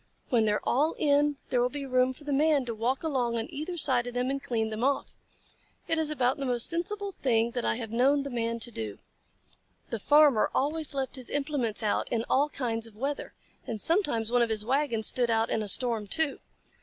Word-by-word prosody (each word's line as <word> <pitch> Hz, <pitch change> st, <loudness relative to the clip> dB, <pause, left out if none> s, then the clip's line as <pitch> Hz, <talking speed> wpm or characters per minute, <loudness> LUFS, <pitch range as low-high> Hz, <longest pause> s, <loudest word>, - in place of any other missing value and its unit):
When 235 Hz, -4 st, +3 dB
they 210 Hz, -, +2 dB
are 210 Hz, -, -1 dB
all 300 Hz, +6 st, +1 dB
in, 290 Hz, 0 st, +2 dB
there 245 Hz, -, +2 dB
will 245 Hz, -, +2 dB
be 280 Hz, +1 st, -6 dB
room 255 Hz, -1 st, +2 dB
for 260 Hz, +3 st, -13 dB
the 290 Hz, -1 st, -2 dB
Man 290 Hz, -1 st, +3 dB
to 235 Hz, -, -3 dB
walk 240 Hz, +6 st, -1 dB
along 250 Hz, -7 st, 0 dB
on 225 Hz, -, -2 dB
either 310 Hz, +5 st, -5 dB
side 250 Hz, -6 st, +4 dB
of 245 Hz, -, -6 dB
them 250 Hz, +2 st, 0 dB
and 275 Hz, 0 st, -3 dB
clean 225 Hz, -4 st, -2 dB
them 215 Hz, +2 st, -3 dB
off. 275 Hz, +1 st, 0 dB, 0.7 s
It 325 Hz, -, +1 dB
is 315 Hz, -1 st, 0 dB
about 265 Hz, -4 st, +1 dB
the 275 Hz, -, -3 dB
most 240 Hz, -2 st, +2 dB
sensible 400 Hz, +4 st, -2 dB
thing 235 Hz, -8 st, +1 dB
that 245 Hz, 0 st, -3 dB
I -, -, +1 dB
have 225 Hz, -2 st, -6 dB
known 275 Hz, +5 st, +3 dB
the 280 Hz, -, -6 dB
Man 230 Hz, -1 st, -2 dB
to 240 Hz, -, 0 dB
do." 110 Hz, -, -5 dB, 0.9 s
The 230 Hz, -, -2 dB
Farmer 290 Hz, -2 st, +5 dB
always 300 Hz, +1 st, 0 dB
left 270 Hz, 0 st, -2 dB
his 255 Hz, -, -5 dB
implements 275 Hz, -7 st, -1 dB
out 210 Hz, -, 0 dB
in 230 Hz, -1 st, 0 dB
all 285 Hz, +3 st, +3 dB
kinds 230 Hz, -5 st, -2 dB
of 220 Hz, -, -17 dB
weather, 275 Hz, +6 st, -4 dB, 0.3 s
and 225 Hz, -2 st, -4 dB
sometimes 290 Hz, -, +1 dB
one 245 Hz, 0 st, +3 dB
of 235 Hz, -, +2 dB
his 215 Hz, -1 st, -2 dB
wagons 255 Hz, -4 st, 0 dB
stood 245 Hz, +1 st, +1 dB
out 225 Hz, 0 st, +1 dB
in 220 Hz, -, 0 dB
a 210 Hz, -, -4 dB
storm 225 Hz, -1 st, +2 dB
too. 315 Hz, +4 st, 0 dB
255 Hz, 225 wpm, -28 LUFS, 230-290 Hz, 0.9 s, Farmer